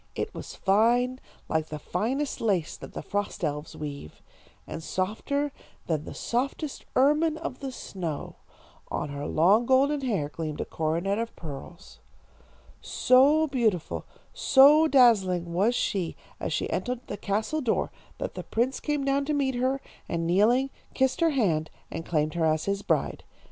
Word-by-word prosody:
It - - -3
was - - -8
fine, 240 +6 +2 0.3
like 160 0 0
the 155 - -5
finest 265 - -2
lace 190 -8 0
that - - -11
the - - -6
frost 205 -2 -3
elves 150 -1 -3
weave, 140 - -7 0.4
and - - -6
softer 220 - -1 0.3
than 155 -2 -1
the - - -8
softest 275 +4 -2
ermine 300 +4 +3
of 320 -6 -5
the 270 -2 -4
snow. 170 - -5 0.5
On 150 - -2
her 145 +1 -5
long 200 +9 +4
golden 275 +2 +3
hair 205 - 0
gleamed 155 0 -5
a - - -1
coronet 170 +6 -1
of 230 0 -4
pearls. 160 +3 -9 0.8
"So 285 +5 +4
beautiful, 230 - -1 0.3
so 290 +4 +6
dazzling 190 - +4
was 205 +8 +2
she 185 -8 -1 0.2
as - - -3
she - - 0
entered 250 -1 -2
the - - -5
castle 215 +10 -1
door, 240 -5 0 0.3
that - - -4
the - - -5
prince 245 +4 0
came 295 -2 -1
down 275 0 +1
to 300 - 0
meet 270 -2 +1
her, 260 +2 0 0.3
and 165 -1 -1
kneeling, 230 +10 +3 0.2
kissed 265 +5 +1
her 335 - +5
hand, 175 - +1 0.2
and 165 - -4
claimed 155 -2 +1
her 170 -2 +1
as 155 0 +1
his 200 0 -1
bride. - - 0
220 Hz, 160 wpm, -27 LUFS, 170-270 Hz, 0.8 s, so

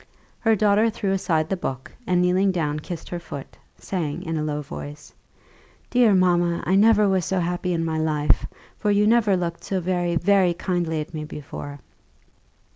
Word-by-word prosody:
Her 225 -1 +3
daughter 210 +2 +3
threw 210 -3 -2
aside 165 -5 0
the 195 - -1
book, 130 -7 -5 0.2
and 180 -1 +2
kneeling 185 +2 +3
down 150 -4 -1
kissed 165 +2 -7
her 175 - -4
foot, 140 -5 -9 0.2
saying, 170 -3 -4
in 165 -2 -3
a 155 - -1
low 150 -1 -2
voice, 145 +1 -9 0.8
"Dear 240 -5 +4
mamma, 175 -2 +2
I 185 - +1
never 210 +1 +5
was 190 -2 +1
so 190 +2 -1
happy 180 +1 -2
in 165 -1 0
my 160 -1 -1
life; 150 -2 +1 0.3
for 210 - 0
you 205 0 +3
never 215 -3 +3
looked 170 -1 -4
so 190 - -2
very, 175 -1 -1
very 185 0 +3
kindly 175 -4 -1
at 150 - -9
me 155 -1 -4
before." 145 -1 -8
175 Hz, 180 wpm, -23 LUFS, 160-195 Hz, 0.8 s, never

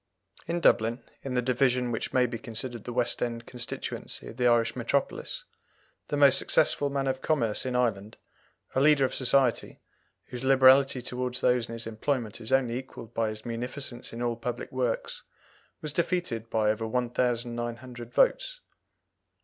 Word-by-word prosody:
In 170 +1 -1
Dublin, 115 -1 +3 0.2
in 135 -2 -4
the 125 - +1
division 125 0 +1
which 115 - -3
may 125 -1 +3
be 120 -1 -4
considered 120 -1 -4
the 125 - -4
West 120 0 +1
End 115 -1 -2
constituency 125 -1 -5
of 115 - -11
the 125 -1 +3
Irish 115 -1 +3
metropolis, 125 +3 -2 0.6
the 145 - -2
most 140 -2 +7
successful 145 - +3
man 140 -1 -1
of 130 0 -1
commerce 125 -7 0
in 125 - -2
Ireland, 110 -4 -1 0.6
a 130 - +2
leader 145 -1 +5
of - - -3
society, 130 -1 +1 0.5
whose 125 0 -7
liberality 130 -1 +5
towards 125 0 -3
those 125 -2 +2
in - - -6
his 115 0 -3
employment 115 0 -2
is 110 - -5
only 125 -2 +2
equalled 120 -3 -11
by 115 -1 0
his 110 0 -8
munificence 120 +2 -5
in 115 +1 -5
all 120 -1 0
public 120 +1 -5
works, 125 -3 -2 0.6
was 150 -2 -3
defeated 165 -10 -1
by 110 -2 +2
over 110 +1 -3
1900 120 0 -2
votes. - - +2
125 Hz, 160 wpm, -28 LUFS, 115-130 Hz, 0.6 s, most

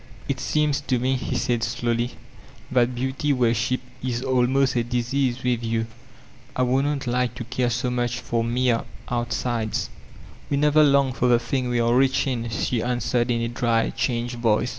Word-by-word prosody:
"It 135 -2 -2
seems 150 +1 +1
to 130 - +2
me, 130 +2 +1
he 130 0 -3
said 120 -1 0
slowly, 120 +1 -1 0.6
"that 125 -1 +2
beauty 130 +4 -1
worshq> 120 0 +1 0.3
is 125 -1 -2
almost 130 +1 +2
a 120 - +2
disease 125 +2 -1
with 120 -2 0
you. 115 0 0 0.7
I 130 - +2
wouldn't 135 +3 +1
like 125 -1 0
to 120 - -5
care 125 +1 -1
so 120 +1 -1
much 125 0 -1
for 120 -2 -1
mere 120 0 +1 0.3
out 120 -1 -1
sides." 115 -3 -2 0.6
"We 140 - +1
never 150 +1 +5
long 140 -2 +4
for 125 - +1
the 120 -1 +5
thing 125 +1 -2
we 120 -1 +1
are 115 0 +2
rich 130 +1 +3
in, 120 -4 -2
die 115 +2 -1
answered 120 0 0
in 115 -1 +1
a 115 - 0
dry, 115 -1 +1
changed 120 -1 -2
voice. 115 +1 +2
125 Hz, 180 wpm, -24 LUFS, 120-130 Hz, 0.7 s, never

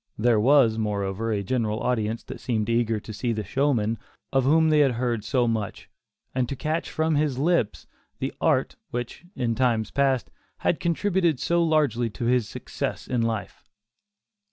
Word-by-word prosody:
There 115 0 +3
was, 120 -2 +4
moreover, 105 +1 -1
a 100 -2 -1
general 110 0 -1
audience 115 -2 -1
that - - -8
seemed 110 -3 -1
eager 115 -2 +1
to 110 - -9
see 120 +3 -1
the 110 -1 -3
"showman" 115 -1 0 0.3
of 135 -1 +3
whom 160 +3 +4
they 155 -1 +4
had 140 -4 +4
heard 120 -2 -1
so 120 +2 +1
much, 110 -3 -3 0.4
and 125 -2 0
to 140 - -3
catch 155 +4 -2
from 160 0 0
his 145 -3 +1
lips 155 - +1 0.3
the - - -3
"art" - - +1
which, 120 +6 -5
in 120 -3 0
times 115 -3 +1
past, 135 -3 +1 0.3
had 165 - +1
contributed 170 -3 +1
so 170 0 +1
largely 145 -8 +2
to 110 +3 -5
his 120 -2 +2
success - - -4
in 125 -2 0
life. 115 -3 -3
120 Hz, 170 wpm, -25 LUFS, 110-145 Hz, 0.4 s, was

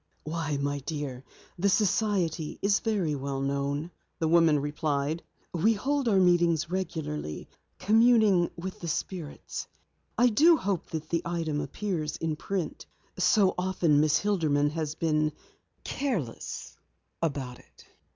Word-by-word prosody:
"Why, 155 -2 -2
my 140 0 -1
dear, 140 -3 -5 0.4
the 200 +3 +3
society 190 -5 +1
is 200 0 +3
very 200 -9 0
well 140 -1 -3
known," 140 +4 -2 0.3
the 160 - 0
woman 165 -2 +5
replied. 145 +1 -1 0.3
"We 180 +7 +3
hold 275 +5 -1
our 205 -4 +4
meetings 175 -2 +3
regularly, 155 - -4 0.3
communing 215 -3 +4
with 185 +2 -6
the 170 - -6
spirits. 165 -1 -4 0.5
I 245 +1 +5
do 315 +9 +6
hope 195 - -2
that 160 -1 -5
the 170 - +1
item 165 -3 -2
appears 170 -8 -3
in 160 -1 -2
print. 180 0 -4 0.3
So 200 -4 +4
often 180 -5 +2
Miss 150 0 +4
Hilderman 155 -8 +1
has 155 -1 -3
been 155 -2 +1 0.5
careless 195 - -3 0.5
about 140 -6 -2
it." - - -20
165 Hz, 130 wpm, -28 LUFS, 150-195 Hz, 0.5 s, do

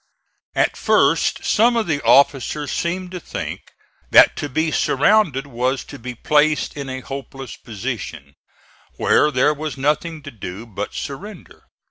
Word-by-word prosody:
At - - +2
first - - +2
some 235 +2 +3
of 225 - +1
the 145 -4 -1
officers 140 +1 +3
seemed 180 +1 -2
to 180 - -5
think - - -6 0.5
that - - +7
to 145 - -3
be 160 +4 0
surrounded 145 -2 +2
was 130 0 -1
to - - -11
be 125 +1 -7
placed 150 +4 +1
in 140 -2 -6
a 130 0 -5
hopeless 135 0 -8
position, 110 - -6 0.6
where 150 - +3
there 145 +2 +2
was 150 -1 -5
nothing 150 +3 -1
to 140 - -8
do 105 -1 -8
but 105 -3 -6
surrender. 200 +10 -8
140 Hz, 145 wpm, -20 LUFS, 130-155 Hz, 0.6 s, that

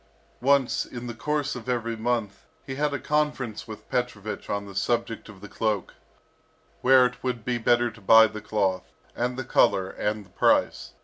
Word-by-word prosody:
Once, 135 0 +3
in 120 0 -8
the 120 - -5
course 150 +4 -2
of 125 0 -7
every 115 -2 -1
month, 110 -2 -2 0.2
he 135 - -5
had 145 +2 0
a 145 - -1
conference 150 -8 -1
with 110 -2 -10
Petrovich 110 -4 -3
on 100 0 -2
the 100 - -10
subject 115 +3 -1
of 100 -3 -13
the 105 - -9
cloak, 105 -3 -2 0.9
where 130 0 +6
it 125 0 -4
would 125 -4 -3
be 125 -1 -1
better 120 +1 +2
to 110 0 -16
buy 110 +3 +8
the 110 -1 -5
cloth, 95 -3 -1 0.2
and 125 +1 -2
the 130 - -3
colour, 95 -4 +2
and 105 0 -3
the - - -22
price. - - +1
120 Hz, 185 wpm, -26 LUFS, 105-125 Hz, 0.9 s, buy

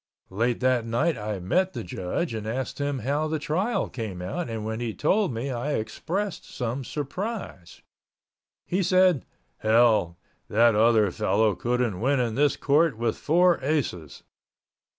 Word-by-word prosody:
Late 115 +5 0
that 130 -2 +2
night 120 +8 0
I 105 -2 -4
met 185 - 0
the - - -5
judge 95 - -3
and 110 -1 -4
asked 125 +5 -3
him 145 -1 -1
how 145 +3 0
the 155 0 -1
trial 180 +10 -1
came 110 -7 -6
out 100 - -4
and 110 -2 -4
when 110 +1 -3
he 120 -2 -3
told 195 +3 +2
me 120 +4 -3
I 130 +4 -2
expressed 185 - -3
some 125 +2 -4
surprise. 150 - -6 0.8
He 185 +3 0
said, 185 -5 +3 0.3
"Hell, 110 -6 +3 0.3
that 115 +2 +4
other 110 -2 +4
fellow 105 +2 +2
couldn't 120 -3 -1
win 135 +2 +2
in 120 -3 0
this 140 +3 +2
court 145 -2 +2
with 115 -1 0
four 175 +3 +3
aces!" 130 - -2
125 Hz, 150 wpm, -26 LUFS, 110-155 Hz, 0.8 s, that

